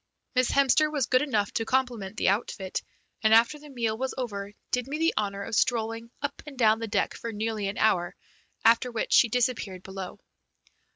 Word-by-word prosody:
Miss 255 -1 +2
Hemster 280 +3 +4
was 290 -5 0
good 255 +1 +3
enough 215 -9 0
to 225 - 0
compliment 230 -5 -1
the - - +3
outfit, 195 -2 -2 0.4
and, 220 0 +5
after 235 +6 +4
the 295 0 -13
meal 230 -5 -1
was 260 +3 -3
over, 205 -6 -4 0.2
did 250 0 0
me 290 +2 -3
the 325 +1 +2
honour 200 -1 -2
of 225 - -7
strolling 230 0 0
up 285 0 -3
and 280 -3 -9
down 220 -2 +4
the 230 - -3
deck 205 -2 0
for 230 - -6
nearly 215 -1 -2
an 200 - -4
hour, 175 -5 +2 0.5
after 230 +2 +5
which 230 - -2
she 235 - +6
disappeared 220 -6 -1
below. 190 -1 -7
230 Hz, 190 wpm, -27 LUFS, 205-255 Hz, 0.5 s, she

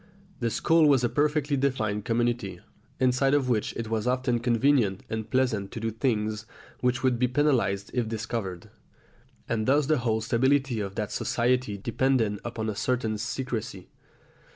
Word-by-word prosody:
The 120 - 0
school 160 +6 +3
was 135 -4 +4
a 120 - +2
perfectly 150 0 +1
definite 110 -7 -1
community, 120 -3 -1 0.4
inside 130 +2 +3
of 135 -3 +1
which 110 -4 +1
it 115 - -3
was 110 +1 -1
often 125 -1 +1
convenient 120 -4 +2
and 110 -1 -3
pleasant 120 -7 0
to - - -5
do 115 0 -2
things 110 -2 -1 0.3
which 125 0 0
would 125 -2 +2
be 125 - +3
penalised 125 -8 +1
if 120 -3 0
discovered; 110 -5 -4 0.8
and 110 -2 -1
thus 145 +2 +4
the 155 -1 +2
whole 115 -2 0
stability 130 +2 +1
of 100 -1 -4
that 105 -1 -3
society 125 -3 0
depended 115 -1 0
upon 115 -2 -4
a 110 - -2
certain 110 -2 -1
secrecy. 115 0 -4
120 Hz, 155 wpm, -27 LUFS, 110-130 Hz, 0.8 s, was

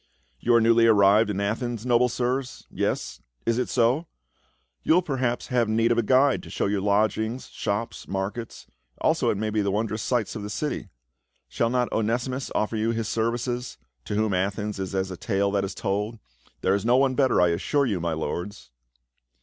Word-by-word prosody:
" - - -40
You 120 - +3
are 115 - +5
newly 115 0 +5
arrived 105 0 +5
in 100 -1 -2
Athens, 115 +3 -2
noble 125 0 +3
sirs? 125 +2 -2
Yes - - -2
— - - -44
it 115 - +2
is 125 - -1
so? 125 +7 +2 0.7
You 160 - +3
will 180 - +3
per 140 -5 -3
haps 120 -2 -1
have 120 -4 +1
need 115 +2 +2
of 120 - +3
a - - +4
guide 130 +4 +3
to - - -12
show - - -1
you 100 -1 0
lodgings, 110 +4 0
shops, 110 +3 -3
markets, 100 +4 -4 0.3
also - - +2
it - - 0
may 110 +1 -2
be 105 0 +1
the 100 - 0
wondrous 110 +2 -1
sights 120 +3 -1
of 110 - -4
the 105 - -6
city? 150 +8 -3 0.6
Shall 115 - 0
not 125 0 0
Onesimus 120 +4 -1
offer 110 +1 0
you 110 +1 0
his 115 -2 -1
services, 120 +2 -2 0.3
to 105 - -3
whom 110 -1 +1
Athens 100 +2 -2
is 95 0 -4
as 95 0 -1
a 90 - -6
tale 100 0 0
that 100 -1 +1
is 95 0 -4
told; 105 +3 -2 0.4
there 95 - +2
is 100 - 0
no 120 +2 +4
one 135 -1 +3
better, 130 -1 +3
I 90 -1 +5
assure 140 - +1
you, 105 -8 -1
my 85 -1 -1
lords." 85 - -5
110 Hz, 205 wpm, -25 LUFS, 100-120 Hz, 0.7 s, are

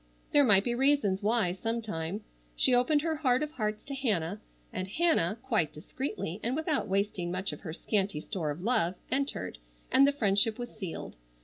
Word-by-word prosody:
There 290 - +6
might 200 -6 +6
be 240 - 0
reasons 250 -7 +2
why, 210 -3 +2
sometime. 210 -3 -3 0.3
She 250 - +3
opened 290 +5 +4
her 320 -2 0
heart 260 -2 +2
of 300 - -4
hearts 215 -7 -3
to 280 - -7
Hannah, 205 -8 -1 0.3
and 185 0 -3
Hannah, 215 - +2
quite 220 - +1
discreetly, 205 - -5
and 240 +3 -1
without 315 0 0
wasting 195 -2 -1
much 185 +2 -2
of - - -8
her 170 - -7
scanty 195 -1 -1
store 160 0 -3
of 150 +5 -5
love, 210 -6 +1 0.2
entered, 260 - -2 0.3
and 275 +1 +6
the - - +4
friendship 215 -4 +2
was 240 -1 -5
sealed. 190 - -6
215 Hz, 180 wpm, -30 LUFS, 185-265 Hz, 0.3 s, There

